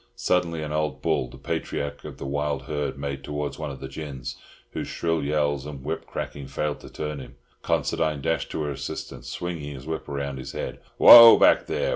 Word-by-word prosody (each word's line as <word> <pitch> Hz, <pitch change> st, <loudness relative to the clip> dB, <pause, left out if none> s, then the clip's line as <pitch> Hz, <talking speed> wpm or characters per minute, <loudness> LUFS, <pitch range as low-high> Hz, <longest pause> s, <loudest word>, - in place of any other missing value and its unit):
Suddenly 90 Hz, -8 st, 0 dB
an 75 Hz, -, -5 dB
old 75 Hz, -1 st, -2 dB
bull, 65 Hz, -, +1 dB
the -, -, -12 dB
patriarch 70 Hz, 0 st, -4 dB
of -, -, -8 dB
the -, -, -7 dB
wild 70 Hz, -1 st, -2 dB
herd, 70 Hz, -1 st, -3 dB
made 70 Hz, -1 st, -5 dB
towards 75 Hz, 0 st, -4 dB
one 75 Hz, -1 st, -3 dB
of 70 Hz, -, -8 dB
the 65 Hz, -, -6 dB
gins, 65 Hz, -2 st, -6 dB, 0.4 s
whose -, -, -4 dB
shrill 80 Hz, -2 st, -1 dB
yells 75 Hz, -1 st, 0 dB
and 70 Hz, -3 st, -8 dB
whip -, -, -4 dB
cracking 70 Hz, -2 st, -6 dB
failed 75 Hz, +2 st, -2 dB
to -, -, -12 dB
turn 75 Hz, -1 st, -5 dB
him. 65 Hz, -1 st, -11 dB, 0.3 s
Considine 75 Hz, -2 st, 0 dB
dashed 80 Hz, +4 st, -1 dB
to 75 Hz, -, -3 dB
her 75 Hz, -, -2 dB
assistance, 70 Hz, -3 st, -6 dB
swinging 80 Hz, -2 st, -5 dB
his 65 Hz, 0 st, -10 dB
whip 80 Hz, 0 st, -4 dB
round 70 Hz, -1 st, -4 dB
his 65 Hz, -, -7 dB
head. -, -, -5 dB, 0.2 s
"Whoa 115 Hz, -1 st, +11 dB
back, -, -, +5 dB
there! -, -, -1 dB
75 Hz, 200 wpm, -25 LUFS, 70-75 Hz, 0.4 s, Whoa